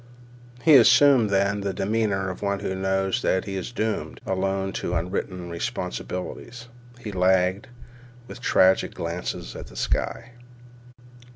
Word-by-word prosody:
He 155 Hz, -3 st, +8 dB
assumed, 125 Hz, -1 st, +6 dB
then, 100 Hz, +1 st, +1 dB
the 100 Hz, -1 st, -3 dB
demeanor 100 Hz, -2 st, 0 dB
of 95 Hz, -, -10 dB
one 100 Hz, -1 st, -1 dB
who 95 Hz, -, -2 dB
knows 95 Hz, 0 st, 0 dB
that 95 Hz, -, +1 dB
he 95 Hz, -1 st, -5 dB
is 95 Hz, +5 st, -4 dB
doomed 110 Hz, -2 st, -3 dB
alone 95 Hz, 0 st, -1 dB
to 90 Hz, -, -2 dB
unwritten 90 Hz, +1 st, -3 dB
responsibilities. 90 Hz, +7 st, -5 dB, 0.3 s
He 110 Hz, -4 st, -6 dB
lagged, 95 Hz, +1 st, +2 dB, 0.6 s
with 125 Hz, -, -10 dB
tragic 95 Hz, -6 st, +3 dB
glances 85 Hz, +1 st, -5 dB
at -, -, -8 dB
the -, -, -15 dB
sky. -, -, -2 dB
95 Hz, 130 wpm, -24 LUFS, 95-110 Hz, 0.6 s, He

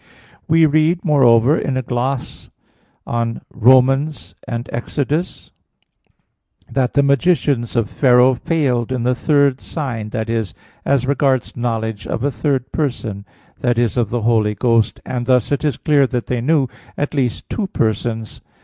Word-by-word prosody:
We 165 Hz, 0 st, +5 dB
read, 155 Hz, +4 st, +2 dB
moreover, 130 Hz, -3 st, +4 dB
in 135 Hz, -4 st, -2 dB
a 130 Hz, -, -2 dB
gloss 125 Hz, +2 st, -3 dB, 0.6 s
on 115 Hz, -1 st, -2 dB
Rom. 125 Hz, +2 st, +6 dB
1 135 Hz, +4 st, 0 dB, 0.3 s
and 120 Hz, +1 st, -4 dB
Ex. 120 Hz, +5 st, -6 dB
8 150 Hz, +5 st, -2 dB, 1.2 s
that 130 Hz, -2 st, 0 dB
the 140 Hz, -, +4 dB
magicians 140 Hz, -4 st, +1 dB
of 115 Hz, -3 st, +1 dB
Pharaoh 125 Hz, -1 st, +4 dB
failed 130 Hz, -4 st, -1 dB
in 125 Hz, -2 st, -1 dB
the 125 Hz, +1 st, +2 dB
third 140 Hz, 0 st, +2 dB
sign 120 Hz, -9 st, -5 dB
that 110 Hz, 0 st, -3 dB
is, 115 Hz, -6 st, -2 dB, 0.3 s
as 135 Hz, -2 st, +1 dB
regards 135 Hz, -2 st, 0 dB
knowledge 110 Hz, -3 st, -3 dB
of 115 Hz, -, -3 dB
a 145 Hz, -, +1 dB
third 130 Hz, +2 st, -2 dB
person 115 Hz, -9 st, -3 dB, 0.4 s
i.e. 120 Hz, -1 st, +2 dB
of 120 Hz, -4 st, 0 dB
the 120 Hz, -1 st, -2 dB
Holy 110 Hz, -2 st, +2 dB
Ghost 115 Hz, +1 st, +1 dB
and 120 Hz, -2 st, -4 dB
thus 125 Hz, -2 st, +2 dB
it 140 Hz, 0 st, 0 dB
is 150 Hz, -2 st, 0 dB
clear 145 Hz, -3 st, +2 dB
that 125 Hz, -2 st, -3 dB
they 125 Hz, -2 st, -2 dB
knew 145 Hz, +1 st, +2 dB, 0.3 s
at 145 Hz, -, -2 dB
least 130 Hz, -5 st, -2 dB
two 210 Hz, -4 st, -3 dB
persons. 110 Hz, -, -2 dB
125 Hz, 155 wpm, -18 LUFS, 115-140 Hz, 1.2 s, Rom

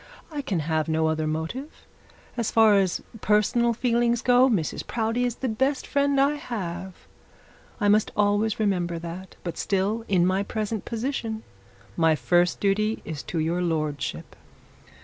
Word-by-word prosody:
I 295 Hz, -2 st, -3 dB
can 195 Hz, -, -1 dB
have 155 Hz, +1 st, 0 dB
no 160 Hz, 0 st, +1 dB
other 160 Hz, 0 st, 0 dB
motive. 160 Hz, -, -5 dB, 0.5 s
As 235 Hz, -3 st, -1 dB
far 220 Hz, -2 st, +5 dB
as 190 Hz, -3 st, 0 dB, 0.2 s
personal 215 Hz, +3 st, +3 dB
feelings 240 Hz, 0 st, +1 dB
go, 250 Hz, +1 st, +5 dB
Mrs 180 Hz, -10 st, -1 dB
Proudie 230 Hz, +2 st, 0 dB
is 240 Hz, -2 st, -1 dB
the 260 Hz, -, -3 dB
best 265 Hz, +5 st, 0 dB
friend 280 Hz, -1 st, +1 dB
I 285 Hz, +2 st, +3 dB
have. 190 Hz, -8 st, -5 dB, 0.8 s
I 205 Hz, -, +1 dB
must 210 Hz, +1 st, +3 dB
always 205 Hz, +1 st, +2 dB
remember 180 Hz, -5 st, 0 dB
that. 170 Hz, +3 st, -8 dB
But 170 Hz, -, -5 dB
still, 200 Hz, +4 st, 0 dB
in 180 Hz, -3 st, +3 dB
my 185 Hz, +2 st, +2 dB
present 215 Hz, +1 st, -3 dB
position, 230 Hz, -2 st, -3 dB, 0.5 s
my 160 Hz, -2 st, +3 dB
first 175 Hz, +2 st, +2 dB
duty 215 Hz, +2 st, 0 dB
is 155 Hz, -3 st, -5 dB
to 170 Hz, -, -3 dB
your 165 Hz, +3 st, 0 dB
lordship.' 155 Hz, -4 st, -2 dB
205 Hz, 150 wpm, -25 LUFS, 175-235 Hz, 0.8 s, far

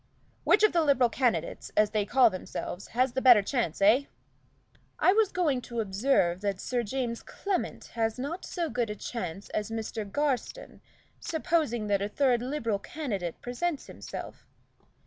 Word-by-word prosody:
"Which 425 Hz, -, +5 dB
of 430 Hz, -, +5 dB
the 340 Hz, -, +4 dB
Liberal 260 Hz, -6 st, +3 dB
candidates, 245 Hz, -1 st, -1 dB
as 210 Hz, 0 st, +4 dB
they 210 Hz, -2 st, 0 dB
call 245 Hz, -3 st, +5 dB
themselves, 185 Hz, 0 st, -6 dB
has 255 Hz, 0 st, +3 dB
the 260 Hz, -, -1 dB
better 245 Hz, -6 st, +7 dB
chance, 215 Hz, -, -1 dB
eh?" 235 Hz, +8 st, +5 dB, 0.9 s
"I 370 Hz, -, +4 dB
was 430 Hz, -2 st, +3 dB
going 300 Hz, -8 st, +1 dB
to 235 Hz, -1 st, -5 dB
observe 195 Hz, -3 st, +1 dB
that 200 Hz, -2 st, -1 dB
Sir 245 Hz, +3 st, -1 dB
James 235 Hz, +1 st, -3 dB
Clement 395 Hz, -2 st, -3 dB
has 225 Hz, 0 st, 0 dB
not 290 Hz, +8 st, -4 dB
so 345 Hz, -2 st, -3 dB
good 240 Hz, -4 st, -1 dB
a 210 Hz, -, -3 dB
chance 195 Hz, -4 st, -5 dB
as 210 Hz, 0 st, -2 dB
Mr. 225 Hz, 0 st, -4 dB
Garstin, 290 Hz, -, -2 dB, 0.4 s
supposing 315 Hz, -9 st, 0 dB
that 200 Hz, -1 st, +1 dB
a 200 Hz, -, -1 dB
third 250 Hz, 0 st, +2 dB
Liberal 240 Hz, -6 st, -1 dB
candidate 200 Hz, -, -4 dB
presents 280 Hz, +6 st, -2 dB
himself. -, -, -9 dB
240 Hz, 160 wpm, -29 LUFS, 210-285 Hz, 0.9 s, better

